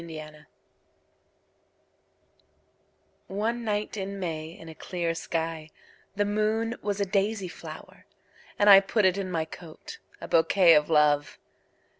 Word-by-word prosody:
My - - -10
Flower 155 0 -11 2.8
ONE 225 +5 -2
night 210 -1 -2
in 195 0 -5
May 160 -3 -4
in 165 0 -13
a 160 - -9
clear 170 0 -3
skyThe 165 +4 -5
moon 215 +3 0
was 205 -1 -2
a 200 - +1
daisy 200 +1 -1
flower:And! 195 +2 0
put 215 -1 +2
it 185 +1 +2
in 190 -1 -4
my 165 -3 -1
coat,A 170 - -12
bouquet 165 +1 +5
of 150 0 +3
Love! 145 -3 +2
185 Hz, 115 wpm, -27 LUFS, 160-205 Hz, 2.8 s, bouquet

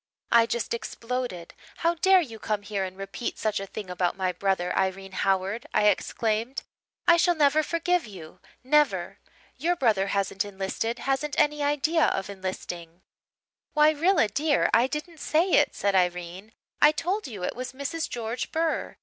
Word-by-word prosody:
"I 230 -1 +6
just 235 0 -2
exploded. 235 -6 -4 0.2
'How 335 +1 +2
dare 375 +2 +5
you 230 -9 -7
come 210 -1 -2
here 200 -1 -2
and 185 0 -6
repeat 195 +4 -5
such 215 -2 -1
a 195 - -6
thing 205 0 -7
about 180 0 -1
my 185 -1 0
brother, 180 -1 -1
Irene 190 0 -1
Howard?' 195 +4 -1
I 210 - +5
exclaimed. 225 +5 -1 0.4
'I 340 - +7
shall 350 +1 +3
never 300 0 +4
forgive 335 0 0
you 175 -6 -11 0.2
never. 300 +3 +2 0.4
Your 350 +2 +1
brother 215 - +2
hasn't 200 0 0
enlisted 205 +4 -3
hasn't 275 +2 -1
any 295 0 +2
idea 295 +3 +2
of 195 +1 -1
enlisting.' 180 -3 -6 0.7
"'Why 300 0 +5
Rilla, 320 - +3
dear, 290 +8 +1
I 235 +3 +5
didn't 310 +3 -6
say 335 +6 +1
it,' - - +4
said 200 -1 0
Irene. 180 +3 -1 0.3
'I 300 - +8
told 370 +5 -2
you 205 -7 -7
it - - -2
was 255 +1 -5
Mrs. 280 +4 -3
George 235 0 -4
Burr. 325 0 -1
230 Hz, 165 wpm, -26 LUFS, 195-300 Hz, 0.7 s, I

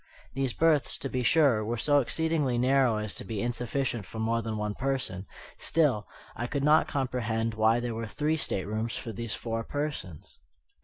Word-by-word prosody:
These 135 -2 -1
berths, 160 -4 +2
to 135 - -4
be 130 - -1
sure, 130 -4 +4
were 115 +3 -2
so 145 +5 +4
exceedingly 150 -1 0
narrow 130 -2 +3
as 105 -1 -3
to - - -3
be 110 -3 -4
insufficient 120 0 -1
for - - -9
more 115 +1 0
than 110 -1 -3
one 105 0 -2
person; 130 -7 -2 0.3
still, 135 -11 +1 0.3
I 120 - -3
could 140 +2 -2
not 150 +2 +5
comprehend 115 -4 -1
why 110 +2 +3
there 120 -1 -3
were 115 0 -4
three 150 +7 0
staterooms 110 -2 -1
for 115 - -5
these 115 +1 -4
four 115 -1 -3
persons. 145 - -5
120 Hz, 175 wpm, -29 LUFS, 110-135 Hz, 0.3 s, not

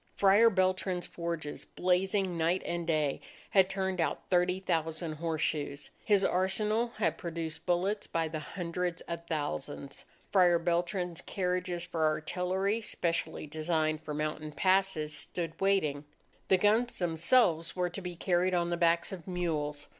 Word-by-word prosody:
Friar 205 +4 +6
Beltran's 185 -2 0
forges, 170 -3 -4
blazing 185 +1 0
night 170 +3 +1
and 170 -1 -3
day, 155 -4 +1 0.3
had 190 -1 +5
turned 190 -2 -1
out 165 - -2
thirty 180 +1 +3
thousand 160 -2 -1
horseshoes. 155 -2 -2
His 205 -2 +3
arsenal 210 +6 +1
had 175 -7 0
produced 165 -1 -5
bullets 185 +4 +1
by 165 -1 0
the 155 0 -4
hundreds 175 +1 -3
of 170 0 -6
thousands. 145 -2 -4 0.3
Friar 180 -3 +5
Beltran's 175 0 -1
carriages 180 -2 -2
for 160 -1 -2
artillery, 185 +7 0
specially 170 -7 -2
designed 155 0 -1
for 150 -1 -5
mountain 155 0 -3
passes, 185 -2 +2
stood 165 +3 -4
waiting. 155 -8 +1 0.4
The 190 - +5
guns 220 +5 +2
themselves 170 0 +2
were 180 -1 0
to 195 - -6
be 180 -1 -5
carried 180 +1 +1
on 175 0 +1
the 175 - 0
backs 170 0 +2
of 185 -3 -8
mules. 155 -5 -2
175 Hz, 140 wpm, -31 LUFS, 160-185 Hz, 0.4 s, Friar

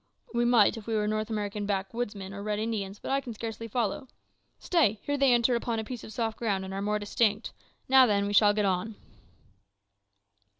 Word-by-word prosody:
"We 240 0 +1
might, 235 -2 +4
if 220 - -10
we 225 - -1
were 210 -1 +1
North 215 +1 -1
American 210 -1 -3
backwoodsmen 200 0 -3
or 200 - -7
Red 210 0 -2
Indians; 210 -3 -3
but - - -6
I 275 0 +2
can 245 -4 -8
scarcely 225 0 -6
follow. 235 +3 -2 0.5
Stay, 255 - +1
here 285 - -1
they 275 -2 +4
enter 240 +1 +3
upon 235 -1 -1
a 220 - -2
piece 240 +1 -7
of - - -9
soft 225 0 -3
ground, 200 -5 -1
and 190 - -7
are 195 - -3
more 210 +1 0
distinct. 210 +1 0 0.3
Now, 260 -1 +7
then, 200 -2 +1
we 205 - -2
shall 205 0 +6
get 210 -1 +1
on." 195 +3 -1
215 Hz, 205 wpm, -28 LUFS, 205-235 Hz, 0.5 s, Now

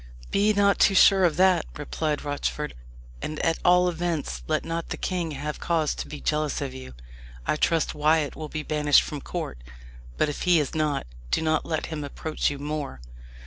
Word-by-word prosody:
"Be 205 +2 +3
not 200 -1 +3
too 195 - +5
sure 190 -1 +7
of 165 -3 +1
that," 185 -2 +4
replied 150 0 -2
Rochford. 145 +1 -3 0.5
"And 155 - -4
at 165 -1 +1
all 180 0 +5
events, 165 - -2
let - - 0
not 165 0 -3
the - - -3
king 180 -3 -2
have 150 +2 -4
cause 160 -3 +1
to - - -6
be 150 - -7
jealous 150 -1 0
of 140 -2 -4
you. 130 - -9 0.5
I - - +1
trust 165 +1 +1
Wyat 150 0 +2
will 155 -1 -6
be 155 0 -4
banished 150 -2 +4
from 145 -2 -6
court. - - -5 0.6
But - - +2
if 145 - -4
he 180 -2 +4
is 145 - -2
not, 150 -3 0 0.2
do 160 - +1
not 155 0 +1
let 160 -2 -1
him 150 -2 -4
approach 155 +2 -2
you 145 - -5
more." 145 - -4
155 Hz, 190 wpm, -26 LUFS, 150-170 Hz, 0.6 s, sure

